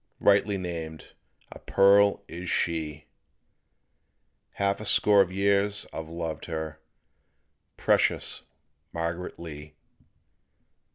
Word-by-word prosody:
Rightly 100 0 +3
named 85 -4 -6 0.4
a - - -10
pearl 100 +1 +4
is 90 +2 -6
she; 75 -3 -1 1.5
Half 100 +1 0
a - - -6
score 105 -1 +5
of 95 -2 0
years 100 +1 +1
I've 80 0 -6
loved 85 -1 -5
her 80 -2 -5 1.0
Precious - - +1 0.5
Margaret 85 +2 -4
Lee. 75 -2 -9
85 Hz, 95 wpm, -27 LUFS, 80-100 Hz, 1.5 s, score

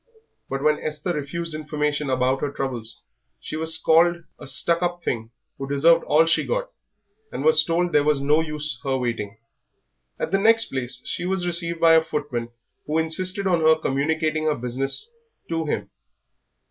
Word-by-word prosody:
But 135 +1 -3
when 150 0 +3
Esther 165 +4 -3
refused 165 +3 -4
information 150 -1 -2
about 130 +1 +1
her 145 - -2
troubles 125 -5 -5 0.4
she - - -7
was 160 0 +2
called 170 +2 +3 0.2
a 145 - -10
stuck 170 +4 +2
up 175 0 -2
thing 115 -2 -3 0.3
who 135 0 -5
deserved 165 +4 +4
all 155 +2 +4
she 165 - +2
got, - - -3 0.6
and 135 +4 -4
was 155 0 +6
told 175 +2 0
there 150 - +3
was 150 -1 +2
no 150 +3 +2
use 150 -4 -4
her 135 -1 0
waiting. 115 -4 -3 0.8
At - - -3
the 195 - +2
next 225 +2 +4
place 125 -1 -2
she 175 - -3
was 190 -1 -1
received 170 -1 -1
by 165 0 +6
a 160 - +6
footman 145 -7 -4 0.4
who 155 +2 0
insisted 185 +5 0
on 175 -3 +2
her 160 0 +5
communicating 155 +2 -1
her 155 -1 +2
business 135 - -2 0.4
to 165 -1 -2
him. - - -3
155 Hz, 170 wpm, -23 LUFS, 135-170 Hz, 0.8 s, was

